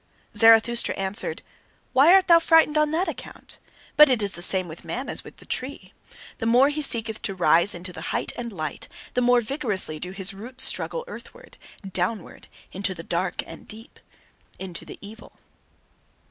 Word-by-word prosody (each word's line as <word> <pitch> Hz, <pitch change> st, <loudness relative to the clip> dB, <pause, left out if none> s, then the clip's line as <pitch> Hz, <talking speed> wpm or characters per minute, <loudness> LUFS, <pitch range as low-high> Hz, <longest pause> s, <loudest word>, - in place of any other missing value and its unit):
Zarathustra 225 Hz, +2 st, +4 dB
answered: 195 Hz, -, -2 dB, 0.5 s
"Why 280 Hz, +6 st, +6 dB
art 380 Hz, 0 st, +5 dB
thou 335 Hz, -2 st, +7 dB
frightened 325 Hz, -2 st, +3 dB
on 305 Hz, 0 st, +2 dB
that 330 Hz, +5 st, -1 dB
account? -, -, -9 dB, 0.4 s
But 300 Hz, -1 st, +8 dB
it 240 Hz, -5 st, +1 dB
is 200 Hz, -, -1 dB
the 175 Hz, -, -2 dB
same 185 Hz, 0 st, +3 dB
with 160 Hz, 0 st, -10 dB
man 260 Hz, +2 st, -5 dB
as -, -, -5 dB
with -, -, -14 dB
the -, -, -15 dB
tree. 260 Hz, +3 st, -5 dB, 0.5 s
The 225 Hz, -, -2 dB
more 250 Hz, +4 st, +4 dB
he 300 Hz, +1 st, -3 dB
seeketh 225 Hz, -5 st, +1 dB
to 195 Hz, -, -4 dB
rise 175 Hz, +2 st, +4 dB
into 180 Hz, +1 st, -7 dB
the -, -, -9 dB
height -, -, -2 dB
and 235 Hz, -1 st, -6 dB
light, 155 Hz, -6 st, -6 dB, 0.3 s
the 250 Hz, -, 0 dB
more 245 Hz, 0 st, +3 dB
vigorously 215 Hz, -, -3 dB
do 180 Hz, -, -5 dB
his 190 Hz, +1 st, 0 dB
roots 250 Hz, +6 st, -5 dB
struggle 485 Hz, 0 st, -1 dB
earthward, -, -, -12 dB, 0.3 s
downward, 190 Hz, +2 st, -4 dB, 0.2 s
into 190 Hz, 0 st, -2 dB
the 165 Hz, -, -9 dB
dark 175 Hz, +2 st, -3 dB
and -, -, -12 dB
deep 225 Hz, +2 st, -11 dB, 0.6 s
into 185 Hz, -3 st, -7 dB
the -, -, -11 dB
evil." 215 Hz, +3 st, -13 dB
225 Hz, 175 wpm, -24 LUFS, 190-275 Hz, 0.6 s, But